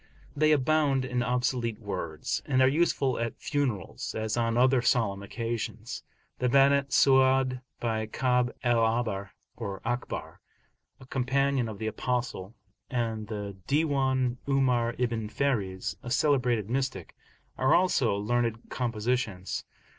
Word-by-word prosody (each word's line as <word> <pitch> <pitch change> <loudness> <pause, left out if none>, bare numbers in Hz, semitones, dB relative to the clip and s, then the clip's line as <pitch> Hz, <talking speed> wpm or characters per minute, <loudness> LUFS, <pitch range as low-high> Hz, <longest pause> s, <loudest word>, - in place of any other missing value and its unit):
They 155 +1 +3
abound 145 -2 +2
in 125 -1 -1
obsolete 125 -2 0
words, 90 -7 -3
and 130 -2 +2
are - - +6
useful 140 -3 +1
at 115 -1 -3
funerals, 130 - -2
as 110 -1 -1
on 115 -1 +1
other 130 0 +4
solemn 115 -5 +1
occasions. 115 +1 -4 0.4
The 125 - +1
Banat 140 +1 +4
Su'adi, 130 -1 +4 0.2
by 110 -2 -1
Ka'ab 125 +1 +1
al 120 -2 +3
Ahbar 110 -4 0 0.3
(or 100 -4 -5
Akhbar), 120 +1 -3 0.6
a 130 - -13
companion 130 -1 0
of 105 - -7
the 110 - -5
Apostle, 115 -2 -2 0.3
and 115 -4 -2
the 105 -2 -5
Diwan 135 -4 +1
'Umar 125 -4 +2
ibn 115 -3 -1
Fariz, 105 -8 -1
a 120 - -7
celebrated 125 -5 +2
mystic, 130 -7 -3 0.4
are 130 - +4
also 155 - +3
learned 115 +2 -1
compositions. 115 -5 -2
120 Hz, 125 wpm, -28 LUFS, 110-130 Hz, 0.6 s, are